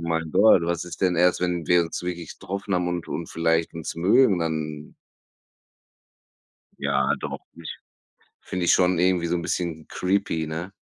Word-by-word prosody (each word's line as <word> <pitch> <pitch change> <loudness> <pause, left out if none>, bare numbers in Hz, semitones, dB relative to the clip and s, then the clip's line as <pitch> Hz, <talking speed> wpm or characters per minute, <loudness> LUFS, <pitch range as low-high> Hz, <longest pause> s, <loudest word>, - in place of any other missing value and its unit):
mein 80 -1 -1
Gott, 100 -1 +5
was 85 +1 -1
ist 90 - -9
denn 90 -2 +2
erst, 90 +1 +3
wenn 90 -3 -1
wir 90 -1 +4
uns 80 - -5
wirklich 85 -2 -6
getroffen 100 +1 -5
haben 90 0 0
und 90 -1 -4
und 85 - -4
vielleicht 80 0 0
uns 80 - -5
mögen, 100 +4 +4
dann“ 80 -2 -4 1.8
Ja 70 -1 +1
doch, - - -5
finde 85 - -14
ich - - -6 0.6
finde 90 -1 -4
ich - - +4
schon 90 -1 +3
irgendwie 90 -1 +2
so 85 +1 0
'n 85 - -3
bisschen 85 -2 -3
creepy, 90 -4 -1
ne? 85 +5 -5
85 Hz, 170 wpm, -24 LUFS, 80-90 Hz, 1.8 s, Gott